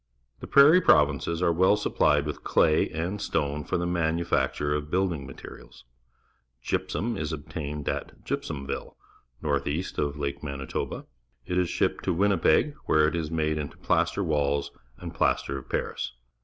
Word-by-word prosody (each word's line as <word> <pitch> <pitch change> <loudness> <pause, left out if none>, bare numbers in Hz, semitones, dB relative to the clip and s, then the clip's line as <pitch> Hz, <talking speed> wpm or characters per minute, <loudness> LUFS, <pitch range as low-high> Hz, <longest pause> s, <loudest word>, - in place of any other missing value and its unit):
The - - -8
Prairie 150 +6 +7
Provinces 75 - +3
are 85 - +4
well 95 +5 +4
supplied 75 -6 +2
with 75 - -5
clav 80 -1 +3
and 85 +6 -3
s - - -4
tone 75 -1 -1
for - - -1
the 85 - -1
manufacture 80 -4 0
of 75 0 -3
building 85 -6 0
materials. - - -12 0.8
Gygsum 95 +5 -1
is 75 +1 -3
obtained 75 -1 -5
at - - -4
Gypsuminlle, 70 -3 -4 0.5
north 70 -2 0
east 80 +6 -3
of 75 0 -1
Lake 70 -1 -3
Manitoba. 70 -2 -4 0.4
It 90 0 0
is 90 -2 +1
shipped - - 0
to 90 - +1
Winnipeg, 100 - +3
where 75 -1 +4
it 80 - -1
is 80 -2 -2
made 75 -1 0
into 70 -1 -6
wall - - -26
plaster 75 -6 +1 0.2
and - - -8
plaster 70 0 0
of 65 - -16
Paris. - - -3
75 Hz, 155 wpm, -27 LUFS, 70-85 Hz, 0.8 s, Prairie